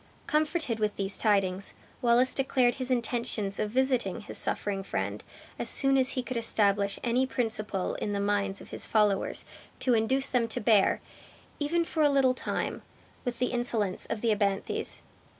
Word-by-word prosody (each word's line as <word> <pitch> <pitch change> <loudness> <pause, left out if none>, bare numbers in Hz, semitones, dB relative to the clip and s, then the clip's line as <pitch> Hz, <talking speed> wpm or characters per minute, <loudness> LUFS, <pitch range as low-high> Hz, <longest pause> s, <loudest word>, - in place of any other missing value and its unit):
Comforted 305 -6 0
with 210 -1 0
these 195 0 0
tidings, 195 -2 +1 0.3
Wallace 245 +1 +4
declared 255 -2 +2
his 255 - -2
intentions 235 -4 -1
of 215 - 0
visiting 255 -5 0
his - - -7
suffering 200 -1 0
friend 195 - -3 0.4
as - - +1
soon 270 -1 +3
as 260 -1 +3
he 255 - -2
could 250 0 -4
establish 200 -3 +2
any 250 +2 +2
principle 215 -6 -2
in 205 - -3
the 200 - -1
minds 200 -1 0
of - - -13
his - - -5
followers 210 -3 +1 0.3
to 255 - +2
induce 260 +4 +2
them 245 -3 +1
to 225 - -3
bear, 210 -2 +3 0.6
even 335 +3 +1
for 320 - -2
a 295 - +5
little 270 -2 +4
time, 255 - -3 0.4
with 245 -1 -2
the 250 - 0
insolence 230 -6 0
of 210 - -3
the 230 - +2
abthanes. 200 -1 -1
230 Hz, 170 wpm, -29 LUFS, 205-255 Hz, 0.6 s, a